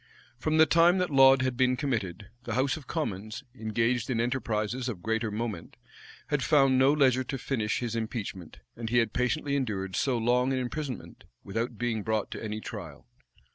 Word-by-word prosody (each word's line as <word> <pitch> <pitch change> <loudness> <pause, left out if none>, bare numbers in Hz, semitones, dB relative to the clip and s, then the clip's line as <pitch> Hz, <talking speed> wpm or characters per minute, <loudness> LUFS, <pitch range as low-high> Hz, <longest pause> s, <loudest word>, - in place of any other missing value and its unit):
From 155 +5 0
the 160 - +8
time 170 +3 +5
that 180 -3 0
Laud 135 -1 +6
had 130 -1 0
been 130 0 +2
committed, 105 - -3 0.2
the 115 - -3
house 130 +3 +1
of 155 -5 -10
commons, 110 - -4
engaged 115 +1 -1
in 120 -3 0
enterprises 120 0 -1
of 95 -7 -6
greater 110 +1 0
moment, 105 -4 -5 0.5
had 145 -2 +1
found 135 -2 +4
no 135 +2 +5
leisure 130 -3 +3
to 135 - -4
finish 120 -5 -1
his 115 -2 -3
impeachment, 110 -6 -5
and 115 -1 -5
he 120 - +2
had 115 -3 +2
patiently 140 +3 0
endured 100 -8 -2
so 130 -3 +1
long 125 +3 +2
an - - 0
imprisonment, 130 0 -5 0.2
without 115 +3 -3
being 115 -2 -1
brought 110 0 -1
to - - -6
any 110 0 -3
trial. 90 -10 -8
120 Hz, 180 wpm, -28 LUFS, 110-135 Hz, 0.5 s, the